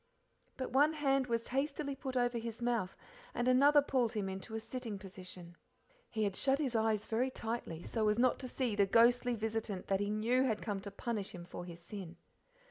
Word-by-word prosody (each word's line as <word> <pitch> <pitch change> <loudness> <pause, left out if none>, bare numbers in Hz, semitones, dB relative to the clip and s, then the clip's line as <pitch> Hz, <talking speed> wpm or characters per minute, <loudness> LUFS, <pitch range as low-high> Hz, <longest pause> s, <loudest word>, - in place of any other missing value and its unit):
But 260 - -3
one 290 +4 +5
hand 275 -3 +2
was 230 -1 -1
hastily 280 +1 -1
put 260 -1 -4
over 245 -1 +1
his 230 0 -5
mouth 235 -6 -1 0.4
and 240 +1 0
another 285 +3 +6
pulled 255 -5 +1
him 200 -3 -1
into 190 +4 -6
a - - -1
sitting 225 -2 -5
position. 185 -3 -9 0.5
He 220 -2 -1
had 200 -2 0
shut 270 +5 +2
his 270 -5 -1
eyes 220 -2 +2
very 240 +4 +1
tightly, 225 -9 -4
so 220 -2 0
as 210 - +2
not 250 +1 +3
to 260 - -5
see 250 -4 -1
the 200 -1 +4
ghostly 240 +3 +4
visitant 220 -3 -3
that 195 -1 +2
he 205 0 -1
knew 225 +4 +2
had 230 -5 +1
come 205 -3 -2
to 200 - -6
punish 205 -1 -3
him 175 -1 -8
for 175 0 -7
his 170 -1 -9
sin. 180 -2 -8
230 Hz, 205 wpm, -34 LUFS, 200-255 Hz, 0.5 s, another